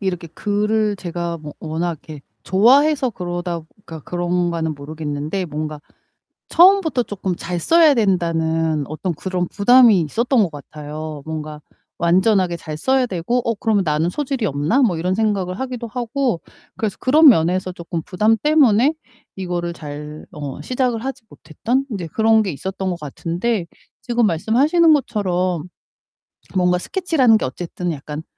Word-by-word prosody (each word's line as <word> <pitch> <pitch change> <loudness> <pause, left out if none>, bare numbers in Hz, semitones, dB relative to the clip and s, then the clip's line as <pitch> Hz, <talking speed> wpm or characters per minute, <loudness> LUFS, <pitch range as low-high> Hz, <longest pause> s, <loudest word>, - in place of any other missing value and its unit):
이렇게 180 -4 -3
글을 210 +3 0
제가 170 -2 -4
뭐 150 -1 -9
워낙 165 +2 -2 0.2
이렇게 150 -3 -8 0.2
좋아해서 265 - +4
그러다 175 -3 -4 0.2
그러니까 160 -6 -9
그런가는 175 -2 -1
모르겠는데 150 +4 -4
뭔가 155 -2 -5 0.7
처음부터 345 -7 +5
쪼끔 190 -4 -4
잘 175 0 -4
써야 325 - +5
된다는 165 - 0
어떤 170 +4 -3
그런 180 +2 -3
부담이 225 -1 +5
있었던 235 - 0
것 175 - -2
같아요. 150 +1 -8
뭔가 155 -1 -6 0.4
완전하게 185 +1 +2
잘 155 -2 -7
써야 260 +9 +2
되고 195 +3 -2
'어 230 - +1
그러면 210 -2 +1
나는 155 +2 +1
소질이 270 0 -2
없나?' 150 - +1
뭐 195 -9 +2
이런 180 +3 -1
생각을 200 -4 -1
하기도 250 -2 -4
하고 245 - -2 0.4
그래서 215 -3 -2
그런 300 +4 +6
면에서 185 -2 +2
쪼끔 170 -1 -5
부담 210 +7 +2
때문에 285 -2 +4 0.4
이거를 175 -2 -3
잘 150 -1 -8
어 145 -4 -6
시작을 250 -3 -1
하지 265 -2 -5
못했던 240 - -2
인제 195 -8 -4
그런 220 +5 +3
게 195 - -2
있었던 190 +5 -4
것 175 -2 -4
같은데 170 - -2 0.4
지금 240 -1 +1
말씀하시는 275 - +3
것처럼 185 - -1 0.9
뭔가 180 -1 +3
스케치라는 285 - +2
게 - - -2
어쨌든 175 +5 -4
약간 150 +1 -6
185 Hz, 330 characters per minute, -20 LUFS, 165-230 Hz, 0.9 s, 그런